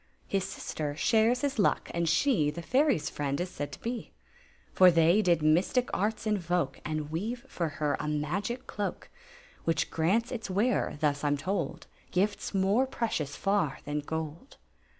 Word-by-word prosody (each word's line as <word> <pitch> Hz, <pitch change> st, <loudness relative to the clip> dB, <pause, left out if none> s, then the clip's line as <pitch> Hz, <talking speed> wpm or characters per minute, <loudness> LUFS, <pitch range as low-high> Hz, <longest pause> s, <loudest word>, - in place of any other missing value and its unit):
His 195 Hz, -2 st, 0 dB
sister 150 Hz, -5 st, -4 dB
shares 230 Hz, +8 st, +3 dB
his 280 Hz, -4 st, -1 dB
luck, 200 Hz, -, +2 dB
and 170 Hz, -1 st, 0 dB
she 170 Hz, -, +3 dB
The 170 Hz, +3 st, -6 dB
fairies' 265 Hz, -, +2 dB
friend 140 Hz, 0 st, -2 dB
is 180 Hz, +1 st, -3 dB
said 145 Hz, -, -5 dB
to -, -, -10 dB
be; 235 Hz, 0 st, -4 dB, 0.6 s
For 185 Hz, -1 st, +8 dB
Aey 170 Hz, +4 st, +5 dB
did 170 Hz, -5 st, +2 dB
mystic 180 Hz, +11 st, +3 dB
arts 215 Hz, +3 st, -1 dB
invoke 175 Hz, -8 st, 0 dB
And 155 Hz, -1 st, -3 dB
weave 220 Hz, +9 st, -3 dB
for 165 Hz, -4 st, -3 dB
Imr 150 Hz, -2 st, 0 dB
a 150 Hz, -, -3 dB
magic 185 Hz, -, -2 dB
doak 205 Hz, -, -3 dB, 0.5 s
Which 165 Hz, -, 0 dB
grants 200 Hz, +9 st, +1 dB
^ -, -, -3 dB, 0.2 s
weara^ 205 Hz, -1 st, +1 dB
^iit 145 Hz, -1 st, 0 dB
I -, -, +2 dB
Yn 145 Hz, 0 st, +2 dB
toid— 170 Hz, 0 st, -2 dB, 0.3 s
Gifts 200 Hz, +3 st, 0 dB
more 200 Hz, +7 st, +2 dB
precious 165 Hz, -, -2 dB
far 195 Hz, -8 st, +1 dB
than 145 Hz, +1 st, -1 dB
gold. 160 Hz, -, -5 dB
175 Hz, 165 wpm, -29 LUFS, 155-215 Hz, 0.6 s, For